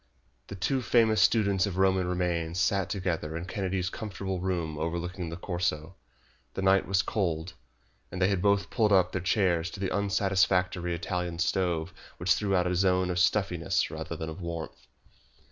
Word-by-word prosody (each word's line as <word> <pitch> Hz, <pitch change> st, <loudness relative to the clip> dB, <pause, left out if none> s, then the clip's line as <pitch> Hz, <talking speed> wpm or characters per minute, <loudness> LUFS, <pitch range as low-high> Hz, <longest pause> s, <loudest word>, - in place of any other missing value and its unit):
The 100 Hz, -, -7 dB
two 130 Hz, +8 st, 0 dB
famous 110 Hz, -3 st, +3 dB
students 100 Hz, -1 st, +3 dB
of 95 Hz, -2 st, -4 dB
Roman 95 Hz, -1 st, +2 dB
remains 90 Hz, -1 st, -1 dB
sat 100 Hz, -1 st, +1 dB
together 85 Hz, -5 st, -2 dB
in 85 Hz, -, -5 dB
Kennedy's 95 Hz, -2 st, -2 dB
comfortable 95 Hz, -3 st, -4 dB
room 85 Hz, -4 st, -2 dB
overlooking 85 Hz, +2 st, -3 dB
the 85 Hz, -, -6 dB
Corso. 85 Hz, -2 st, -2 dB, 0.6 s
The 95 Hz, -, -2 dB
night 95 Hz, 0 st, +4 dB
was 95 Hz, -1 st, +2 dB
cold, 85 Hz, -3 st, -2 dB, 0.6 s
and 90 Hz, -, -5 dB
they 90 Hz, -, +4 dB
had 95 Hz, -3 st, 0 dB
both 100 Hz, 0 st, +2 dB
pulled 110 Hz, -4 st, +2 dB
up 95 Hz, -2 st, +4 dB
their 90 Hz, -, -2 dB
chairs 90 Hz, -2 st, +1 dB
to 100 Hz, -, -9 dB
the 95 Hz, -1 st, -2 dB
unsatisfactory 95 Hz, -3 st, +1 dB
Italian 85 Hz, 0 st, -3 dB
stove 90 Hz, -2 st, 0 dB, 0.2 s
which 90 Hz, +1 st, +3 dB
threw 100 Hz, -2 st, 0 dB
out 90 Hz, -1 st, +2 dB
a 90 Hz, -, 0 dB
zone 90 Hz, 0 st, +2 dB
of 90 Hz, -, -1 dB
stuffiness 90 Hz, -2 st, +1 dB
rather -, -, -5 dB
than 80 Hz, -, -5 dB
of 80 Hz, +4 st, -7 dB
warmth. 85 Hz, -2 st, -6 dB
90 Hz, 170 wpm, -28 LUFS, 85-95 Hz, 0.6 s, night